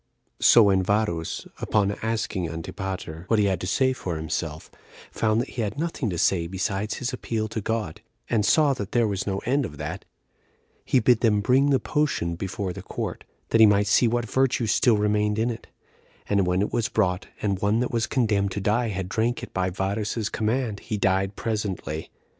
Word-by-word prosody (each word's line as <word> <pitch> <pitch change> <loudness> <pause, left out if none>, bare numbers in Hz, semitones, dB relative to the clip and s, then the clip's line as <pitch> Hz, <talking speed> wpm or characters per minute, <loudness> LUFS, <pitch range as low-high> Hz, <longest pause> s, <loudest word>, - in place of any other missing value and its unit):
7. - - -6
So 115 - +8
when 95 -2 +4
Varus, 95 -4 -1
upon 100 -2 +1
asking 110 -6 -2
Antipater 85 0 -6
what 115 - +2
he 105 - +3
had 95 -3 0
to 90 - -3
say 130 +6 +2
for 90 -9 -4
himself, 80 0 -4 0.4
found 110 0 +1
that 125 - -2
he 120 - -4
had 105 +3 -3
nothing 155 -7 -2
to 90 - -3
say 85 0 +2
besides 95 +3 -2
his 125 0 -3
appeal 110 -3 -2
to 110 - -3
God, 110 -6 -3 0.3
and 110 -3 +1
saw 145 +5 +4
that 100 -7 -6
there 120 -2 +3
was 100 -1 -3
no 95 -1 -2
end 140 +4 +2
of 75 - -6
that, - - -5 0.8
he 130 - +3
bid 120 0 +4
them 110 -3 +3
bring 130 +7 +3
the 135 -2 +3
potion 150 - 0
before 95 +1 -4
the - - -8
court, - - -5 0.2
that 115 - +4
he 110 - +9
might 105 0 +3
see 105 +4 +4
what 120 0 0
virtue 130 +1 +1
still 110 +1 +3
remained 105 0 +1
in 115 +2 +1
it; 115 - -8 0.6
and 100 -3 +2
when 90 +2 +2
it - - -4
was 120 -1 0
brought, 90 -3 0
and 100 -3 -1
one 105 +2 +2
that 125 - -1
was 115 -1 0
condemned 105 -6 +1
to - - -2
die 110 +5 +1
had 95 -3 -3
drank 115 +5 -1
it - - -8
by 95 -1 0
Varus's 105 +4 -2
command, 110 -1 -1
he 110 - -4
died 95 0 +1
presently. 100 -8 -3
105 Hz, 200 wpm, -25 LUFS, 95-115 Hz, 0.8 s, he